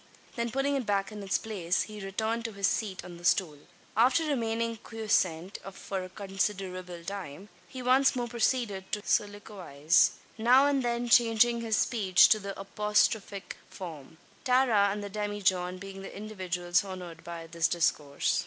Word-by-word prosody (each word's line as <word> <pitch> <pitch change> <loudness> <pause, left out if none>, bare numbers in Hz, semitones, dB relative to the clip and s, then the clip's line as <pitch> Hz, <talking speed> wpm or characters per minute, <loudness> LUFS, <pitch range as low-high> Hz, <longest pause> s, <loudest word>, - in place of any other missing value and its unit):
Then 235 0 -1
putting 270 +3 0
it 265 -4 -2
back 200 0 0
in 210 -1 -7
its 195 -2 0
place, 185 -5 -1
he 210 -2 -9
returned 220 +4 -2
to 225 - -4
his 200 0 -1
seat 195 -1 -1
on 175 -1 -9
the 175 - -14
stool. 170 -4 +2 0.4
After 255 +9 +4
remaining 230 -5 -1
quiescent 195 -6 -1
for 190 -1 -5
a 185 - -8
considerable 190 -3 -4
time, 195 -1 -7 0.2
he 255 -1 -8
once 260 +2 +4
more 245 -1 -2
proceeded 230 -4 -1
to 210 - -1
soliloquise 185 -6 +1 0.3
now 250 +5 +6
and 285 -2 +2
then 240 0 -1
changing 235 0 +4
his 220 -2 0
speech 195 -6 +4
to 215 - +4
the 200 -1 -7
apostrophic 210 0 0
form 160 -4 -9 0.3
Tara 250 -6 +4
and 205 +1 -4
the 205 - -5
demijohn 190 -3 -1
being 195 +1 -9
the 195 - -9
individuals 185 -4 -1
honoured 180 -4 -8
by 170 -1 -7
his 170 0 0
discourse. 155 -4 0
200 Hz, 160 wpm, -29 LUFS, 185-230 Hz, 0.4 s, now